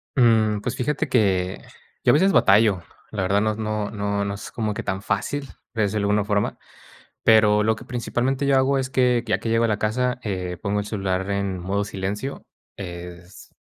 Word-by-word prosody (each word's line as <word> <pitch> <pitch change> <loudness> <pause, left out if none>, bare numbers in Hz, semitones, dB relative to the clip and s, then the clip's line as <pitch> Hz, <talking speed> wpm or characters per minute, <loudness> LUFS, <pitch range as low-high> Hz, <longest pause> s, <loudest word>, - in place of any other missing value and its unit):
Mm, 110 -4 +4
pues, 125 +3 -3
fíjate 135 +4 -1
que, 95 -5 +1 0.4
yo - - +5
a - - +4
veces 190 +6 +4
batallo, 100 - +4 0.3
la 105 -3 -2
verdad 100 +2 +2
no 110 0 0
no 105 -2 -2
no 100 - -2
es 100 - -8
como 110 -2 -2
que - - -5
tan 95 0 -2
fácil, 110 +8 -2 0.3
desde 110 -2 0
alguna 105 0 +2
forma, 105 0 0 0.7
pero 105 -1 +5
lo 110 +1 +2
que - - -12
principalmente 125 +3 -1
yo 140 0 +3
hago 135 +1 +3
es 130 -1 -2
que, 125 -2 +2
ya 105 -4 0
que 115 +1 -4
llego 115 +1 +2
a - - +2
la 105 - 0
casa, 125 +3 0
eh, 90 -4 -3
pongo 105 -1 0
el 105 - -3
celular 95 -2 -2
en 100 -2 -1
modo 100 +3 -1
silencio, 100 +7 -4 0.3
es 90 -1 -9
105 Hz, 190 wpm, -23 LUFS, 100-115 Hz, 0.7 s, yo